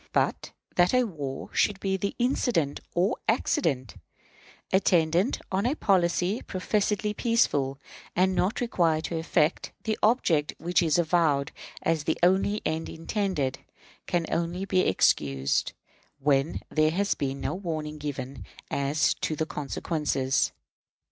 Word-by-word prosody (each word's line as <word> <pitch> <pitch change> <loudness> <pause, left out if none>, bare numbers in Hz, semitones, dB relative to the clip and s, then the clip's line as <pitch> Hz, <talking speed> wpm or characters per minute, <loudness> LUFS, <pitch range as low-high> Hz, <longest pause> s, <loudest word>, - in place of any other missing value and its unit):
But - - 0 0.3
that 175 +4 +4
war 160 - -2
should 205 -2 +2
be 195 -1 0
the 200 +1 -2
incident 240 - +1 0.2
or 185 +6 +2
accident, 135 - 0 0.8
attendant 180 - +3
on 195 +4 +1
a 275 - 0
policy 185 - +1
professedly 210 +2 -1
peaceful, 145 - +1 0.4
and 185 +1 +3
not 195 +8 0
required 165 -9 +1
to 165 -1 -2
effect 160 0 +1
the 220 -1 -1
object 175 - +2
which 175 +2 +1
is 160 -2 +2
avowed 160 -4 +2 0.3
as 160 -3 0
the 160 - +1
only 195 +3 +3
end 160 +1 -2
intended, 165 -6 -2 0.5
can 175 -2 0
only 170 +3 -1
be 185 -1 +1
excused 70 -6 +2 0.4
when 140 +1 +1
there 155 0 +3
has 200 +5 +1
been 140 -1 -3
no - - -2
warning 155 -5 -4
given 140 -2 -5 0.3
as 140 +3 +1
to 155 - -1
the 160 - -1
consequences. 145 -2 -1
170 Hz, 130 wpm, -27 LUFS, 150-195 Hz, 0.8 s, that